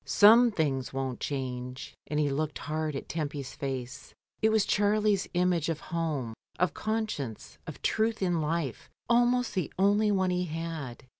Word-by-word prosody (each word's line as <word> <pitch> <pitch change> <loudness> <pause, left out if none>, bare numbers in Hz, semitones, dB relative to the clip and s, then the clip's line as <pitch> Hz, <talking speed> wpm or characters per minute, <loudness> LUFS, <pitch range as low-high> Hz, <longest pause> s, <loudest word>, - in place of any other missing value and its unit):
"Some 230 +4 +7
things 140 - -1
won't 135 -2 -3
change," 125 -2 -4
and 150 - -1
he 145 -2 +2
looked 150 +2 -2
hard 155 0 -3
at 135 - -5
Tempy's 145 -4 -4
face. 130 -3 -5 0.3
It 220 - +4
was 220 -2 +3
Charlie's 210 -1 +2
image 175 -3 +2
of 160 -2 -1
home, 155 -10 -3 0.2
of 180 0 +1
conscience, 215 - -3
of - - -8
truth 220 +1 +1
in 175 -3 +1
life, 155 -4 -2 0.2
almost 245 +1 +3
the 185 -5 -1
only 205 +2 +3
one 190 -2 +2
he 180 0 0
had. 160 -6 -5
165 Hz, 155 wpm, -29 LUFS, 140-205 Hz, 0.3 s, Some